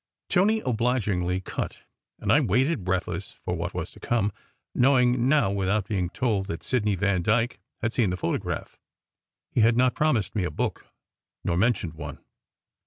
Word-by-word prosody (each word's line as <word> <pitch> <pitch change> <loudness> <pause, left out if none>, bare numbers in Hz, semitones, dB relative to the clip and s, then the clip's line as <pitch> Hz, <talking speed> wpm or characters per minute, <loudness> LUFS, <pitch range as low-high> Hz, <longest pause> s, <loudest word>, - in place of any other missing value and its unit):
Tony 215 +4 +3
obligingly 105 -7 0
"cut," - - -5 0.3
and - - -1
I 145 - +6
waited, 130 - +1
breathless, 95 0 -2
for - - -1
what - - -4
was - - -4
to - - -15
come, 110 -4 0 0.4
knowing 125 -1 +4
now 145 -9 +4
without 100 +1 0
being 95 -5 -1
told 105 -3 0
that 85 -4 -5
Sidney 105 -5 +1
Vandyke 100 +5 +1 0.2
had 110 0 0
seen 115 -6 +2
the 90 - -2
photograph. - - -3 0.7
He - - +2
had 115 +1 +4
not 125 0 +4
promised 140 -10 +1
me 100 - +1
a 90 - 0
book, 75 - -3 0.6
nor 85 - 0
mentioned 100 -4 +1
one. 75 -3 -7
110 Hz, 160 wpm, -26 LUFS, 95-125 Hz, 0.7 s, I